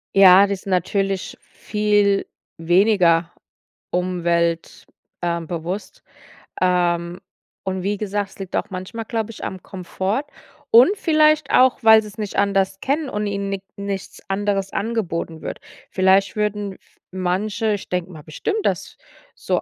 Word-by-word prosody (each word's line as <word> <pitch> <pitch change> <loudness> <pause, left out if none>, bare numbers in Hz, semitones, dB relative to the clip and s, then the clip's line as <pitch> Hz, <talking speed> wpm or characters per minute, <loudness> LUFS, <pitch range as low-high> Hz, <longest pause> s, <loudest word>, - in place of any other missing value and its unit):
Ja, 195 0 +8
das 200 -1 -3
ist - - -22
natürlich 195 +1 -1
viel 205 -2 0 0.3
weniger 175 -1 +3 0.6
umwelt 170 -2 -1 0.4
äh, 170 -1 -1
bewusst, 175 - -6 0.6
ähm, 175 0 +1 0.5
und 190 0 -2
wie 205 +2 -1
gesagt, 205 -1 -2
es - - -18
liegt 190 -2 -6
auch - - -1
manchmal 190 +5 -6
glaube 225 -1 -3
ich 220 - -11
am 185 - -5
Komfort, 190 +6 -3 0.5
und 255 - +6
vielleicht 310 -5 +3
auch, 255 0 +5
weil 220 0 +8
sie's 210 -1 -11
nicht 210 -2 -4
anders 195 -1 +1
kennen 285 +2 0
und 210 0 -2
ihnen 200 0 -3
nik-nichts 200 0 -6
anderes 195 0 -1
angeboten 175 -7 -3
wird. - - -6 0.3
Vielleicht 190 +1 +3
würden 210 -2 -2
f - - -24
manche 195 +4 -1
ich 205 - -5
denke 180 0 -2
mal 155 -3 -11
bestimmt, 415 - -3
dass - - -2 0.4
so - - -1
195 Hz, 140 wpm, -21 LUFS, 180-210 Hz, 0.6 s, Ja